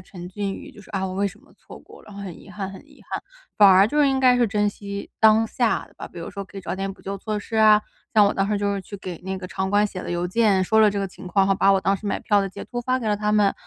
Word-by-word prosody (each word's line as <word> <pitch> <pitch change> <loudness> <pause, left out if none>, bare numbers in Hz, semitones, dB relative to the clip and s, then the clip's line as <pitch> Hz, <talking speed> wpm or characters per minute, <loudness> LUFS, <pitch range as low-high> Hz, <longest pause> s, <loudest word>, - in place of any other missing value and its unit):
沉 180 -1 -10
浸 200 +1 -3
于 - - -10
就 - - -14
是， 200 - -16
啊， 190 -2 -2
我 185 - -5
为 200 +1 0
什 185 - -15
么 - - -23
错 - - -13
过 - - -16
了， - - -22
然 205 - -11
后 200 - -7
很 185 -4 -8
遗 - - -14
憾 200 -2 -5
很 190 - -10
遗 290 - -19
憾， - - -3 0.3
反 205 -1 +8
而 190 +1 +7
就 295 +7 -2
是 285 - +5
应 270 -1 +1
该 255 -1 +5
是 245 -1 +3
珍 210 0 +1
惜 200 -1 -7
当 220 0 +5
下 235 0 0
的 - - -24
吧。 - - -8
比 180 - -12
如 165 - -6
说 200 0 -6
可 195 - -15
以 - - -6
找 180 - -4
点 195 0 -3
补 - - -19
救 195 +1 -4
措 215 +1 -3
施 215 +2 -9
啊， 215 -1 +6 0.3
像 210 -2 +7
我 200 - +1
当 195 0 0
时 210 - +1
就 200 0 0
是 195 - -3
去 200 +2 -9
给 185 -3 -7
那 190 0 -3
个 185 -1 -7
场 190 +1 -3
馆 205 +1 +3
写 190 -2 -7
了 - - -6
邮 175 0 -1
件， 195 -1 +2
说 220 +4 +3
了 215 -1 +6
这 200 - -3
个 195 - -1
情 185 0 -12
况， 195 +2 +2
然 - - -1
后 195 - +4
把 195 +1 +3
我 195 - +4
当 195 - +1
时 200 +2 -7
买 200 - -1
票 205 -1 +2
的 195 - -2
截 190 - -9
图 240 - -5
发 255 +1 0
给 235 - -5
了 210 - +2
他 210 0 -1
们， 210 -1 +4
然 195 - +2
200 Hz, 375 characters per minute, -23 LUFS, 190-215 Hz, 0.3 s, 反